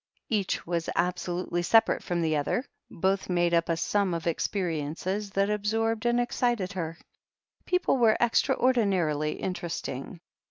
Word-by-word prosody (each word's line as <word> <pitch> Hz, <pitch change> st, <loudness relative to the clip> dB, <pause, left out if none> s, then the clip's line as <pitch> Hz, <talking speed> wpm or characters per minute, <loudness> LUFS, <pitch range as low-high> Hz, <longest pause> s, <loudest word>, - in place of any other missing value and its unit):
Each 205 Hz, -5 st, -1 dB
was 170 Hz, -1 st, -2 dB
absolutely 175 Hz, 0 st, -1 dB
separate 225 Hz, +6 st, +4 dB
from 175 Hz, -1 st, -1 dB
the 155 Hz, -1 st, +1 dB
other, 150 Hz, -, 0 dB, 0.2 s
but -, -, -14 dB
both 190 Hz, +1 st, +1 dB
made 175 Hz, -1 st, +2 dB
up 170 Hz, 0 st, +2 dB
a 165 Hz, -, +1 dB
sum 190 Hz, +1 st, +1 dB
of 165 Hz, -, -5 dB
experiences 175 Hz, +3 st, -2 dB
that 195 Hz, +1 st, +1 dB
absorbed 225 Hz, +2 st, 0 dB
and 240 Hz, 0 st, +3 dB
excited 240 Hz, -5 st, 0 dB
her. 165 Hz, -3 st, -4 dB, 0.7 s
People 360 Hz, -6 st, +2 dB
were 230 Hz, -3 st, +4 dB
extraordinarily 200 Hz, -, +2 dB
interesting. 170 Hz, -3 st, -5 dB
185 Hz, 135 wpm, -28 LUFS, 170-220 Hz, 0.7 s, separate